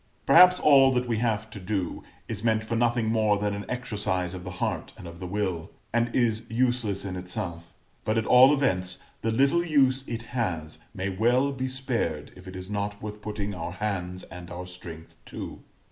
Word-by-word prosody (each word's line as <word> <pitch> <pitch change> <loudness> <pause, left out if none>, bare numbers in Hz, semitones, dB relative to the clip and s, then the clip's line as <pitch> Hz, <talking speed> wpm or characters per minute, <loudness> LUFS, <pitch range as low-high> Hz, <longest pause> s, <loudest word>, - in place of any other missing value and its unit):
Perhaps 180 +1 +8
all 135 -3 +6
that 125 0 0
we 115 -2 0
have 110 -2 -1
to 105 - -8
do 95 -1 -2 0.3
is 110 -2 -4
meant 110 -1 +2
for 115 +1 -3
nothing 120 0 +2
more 110 -2 +2
than 105 0 -1
an 100 0 -5
exercise 100 -7 -2
of 90 -1 -7
the 90 - -6
heart - - -2
and 90 - -9
of 85 0 -10
the 90 - -5
will, 95 -4 -2 0.2
and 120 0 +2
is 115 -2 +1
useless 115 -4 0
in 95 -1 -4
itself; 85 -2 -5 0.3
but, 110 +1 0
at 110 - +1
all 130 +2 +8
events, 95 -11 +1 0.2
the 115 - 0
little 140 +9 +3
use 135 -5 +3
it 115 -1 -4
has 85 -10 -2 0.2
may 95 +1 -2
well 120 +8 +2
be 130 -1 -3
spared 120 - -2
if 90 0 -13
it 95 - -8
is 95 0 -6
not 100 0 -3
worth 105 0 -7
putting 105 -1 -4
our 90 -2 -5
hands 90 -3 -3
and 90 -1 -10
our 90 +1 -6
strength 85 -3 -11
to. - - -7
105 Hz, 195 wpm, -27 LUFS, 90-120 Hz, 0.3 s, Perhaps